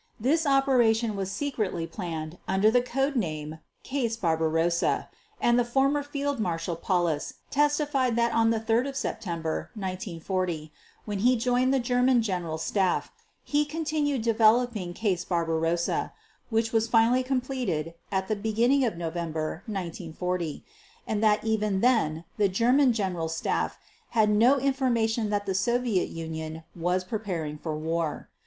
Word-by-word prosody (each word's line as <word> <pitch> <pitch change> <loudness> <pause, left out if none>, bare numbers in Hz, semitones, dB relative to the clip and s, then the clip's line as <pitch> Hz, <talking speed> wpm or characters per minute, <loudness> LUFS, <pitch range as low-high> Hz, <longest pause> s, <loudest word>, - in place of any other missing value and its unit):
This 300 +7 +2
operation 240 -5 +3
was 195 -1 -3
secretly 205 - -2
planned 165 -3 -6
under 195 +3 +3
the 245 +1 +4
code 270 +3 -1
name 155 -7 -3 0.2
"Case 245 -5 -1
Barbarossa", 165 -2 +1 0.3
and 240 0 +3
the - - +4
former 275 +4 +2
Field 285 -1 -3
Marshal 170 -3 -1
Paulus 170 -3 -1 0.2
testified 290 -4 +2
that 235 0 +2
on 225 0 +3
3 230 +4 +1
September 170 -11 -3
1940, 185 -4 -3 0.3
when 205 -2 -3
he 250 +5 +4
joined 250 +2 +2
the 270 - +3
German 245 0 +3
General 175 -6 -2
Staff, 185 +3 0 0.3
he 295 0 +1
continued 295 -4 -1
developing 225 -4 +2
"Case 190 -6 0
Barbarossa", 165 -1 0 0.4
which 225 -1 +1
was 225 0 +2
finally 230 +2 +4
completed 255 - -2 0.2
at 190 -1 0
the 215 - 0
beginning 230 +6 +2
of 225 -8 -1
November 165 -1 -3
1940; 180 -3 -4 0.4
and 215 0 -1
that 215 -1 +3
even 215 -3 0
then, 170 -11 +2
the 205 -2 +3
German 245 +7 +4
General 185 -7 -1
Staff 165 - -1 0.4
had 215 -1 +5
no 235 +6 +5
information 240 -5 +1
that 205 -1 -1
the 190 - -1
Soviet 235 0 +1
Union 160 -1 -6
was 180 +2 0
preparing 180 -7 -4
for 155 -1 -3
war. 160 0 -2
215 Hz, 135 wpm, -27 LUFS, 170-245 Hz, 0.4 s, had